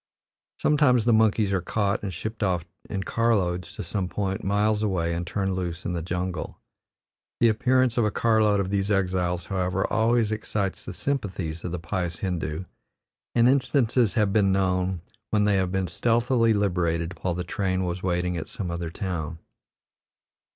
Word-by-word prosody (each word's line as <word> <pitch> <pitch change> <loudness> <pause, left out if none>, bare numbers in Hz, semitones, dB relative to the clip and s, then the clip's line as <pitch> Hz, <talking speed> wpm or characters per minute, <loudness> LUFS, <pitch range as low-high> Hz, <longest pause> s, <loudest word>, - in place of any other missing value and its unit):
Sometimes 135 -6 +3
the 120 - +4
monkeys 110 -2 +3
are 95 - +1
caught 100 +3 0
and 100 - -3
shipped 110 +6 -6
off 90 -5 0 0.2
in 95 -2 -2
car 115 +4 +2
loads 90 -3 -2
to - - -5
some 95 -3 -2
point 95 -1 -2
miles 105 +2 +1
away 90 -5 0
and 85 0 -3
turned 95 +1 -1
loose 90 -2 -4
in 90 - -1
the 85 - -2
jungle. 90 0 -3 0.8
The 115 - +5
appearance 125 +2 +2
of 115 - +3
a - - +2
car 110 +2 +2
load 105 -1 +3
of 95 -1 -1
these 100 0 0
exiles, 90 -3 0
however, 95 0 -1
always 115 -1 +3
excites 105 -3 -2
the - - -6
sympathies 95 - -3
of 90 - -4
the 90 - -2
pious 85 -1 -3
Hindoo, 90 -2 -2 0.7
and 120 0 +5
instances 125 -4 +2
have 105 -3 +2
been 100 -3 +4
known 95 -2 +1 0.3
when 105 -1 +2
they 105 -1 +3
have 95 -1 0
been 95 0 0
stealthily 115 +6 +2
liberated 90 -3 0
while 90 -2 -1
the 90 - -2
train 95 -1 -1
was 90 0 -3
waiting 90 -1 0
at 80 - -5
some 90 -4 -5
other 85 -1 -3
town. 85 -3 -4
95 Hz, 175 wpm, -26 LUFS, 90-110 Hz, 0.8 s, The